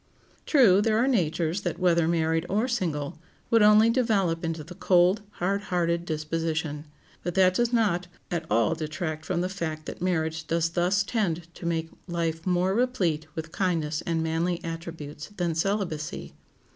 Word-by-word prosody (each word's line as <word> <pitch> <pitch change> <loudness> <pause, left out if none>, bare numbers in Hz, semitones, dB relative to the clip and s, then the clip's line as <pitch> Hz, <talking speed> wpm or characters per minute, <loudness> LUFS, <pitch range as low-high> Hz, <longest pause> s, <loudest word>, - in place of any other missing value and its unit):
True, 220 - +6
there 215 0 +2
are 240 +3 +3
natures 175 - +1
that, - - -3
whether 170 -3 +3
married 165 0 +1
or 215 +6 +1
single, 160 - -2 0.3
would 230 -1 +5
only 210 +2 +6
develop 200 -9 +1
into 165 -2 -3
the 175 +4 -10
cold, 180 +3 +3
hard 195 +3 -1
hearted 170 -1 0
disposition; 155 -1 -2 0.4
but 175 - -4
that 185 -1 +5
does 240 +4 +1
not 200 -7 +1 0.2
at 165 -2 -2
all 115 +6 +3
detract 155 0 -4
from 175 -2 -1
the 180 - 0
fact 160 -5 -4
that - - -7
marriage 160 -3 -1
does 165 0 +1
thus 180 +4 +2
tend 175 -7 -2
to 170 - -6
make 165 -1 -1 0.2
life 165 -1 -2
more 180 +1 +2
replete 190 -10 0
with 160 0 -5
kindness 165 -5 -1
and 165 -1 0
manly 165 +2 0
attributes 165 -3 -6
than 175 -2 0
celibacy. 165 -3 -2
170 Hz, 160 wpm, -27 LUFS, 160-190 Hz, 0.4 s, True